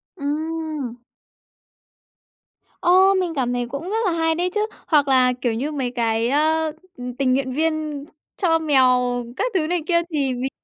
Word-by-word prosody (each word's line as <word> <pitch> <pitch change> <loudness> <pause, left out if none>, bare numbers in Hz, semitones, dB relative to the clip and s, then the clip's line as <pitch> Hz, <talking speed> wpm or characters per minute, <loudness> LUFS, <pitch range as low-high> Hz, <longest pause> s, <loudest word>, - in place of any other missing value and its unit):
Ừm. 310 -4 -3 1.9
Ô! 375 +2 +5
Mình 365 -3 0
cảm 250 -3 0
thấy 245 0 -1
cũng 280 +8 -6
rất 435 - -1
là 375 - +2
hay 325 -1 +1
đấy 355 +2 0
chứ. 420 - +2 0.3
Hoặc 295 -3 +3
là, 255 -2 +4
kiểu 240 -2 0
như, 265 +7 -2
mấy 265 -5 -2
cái, 230 -1 0
ơ, 315 +3 +2 0.3
ừ, 250 - -8
tình 260 -2 +2
nguyện 260 0 0
viên 310 -1 -1 0.4
cho 325 -3 +3
mèo 260 -5 +4 0.4
các - - 0
thứ 330 -5 +1
này 350 0 0
kia 340 -2 +3
thì 275 -4 0
mình 250 +2 -2
300 Hz, 170 wpm, -22 LUFS, 255-325 Hz, 1.9 s, Ô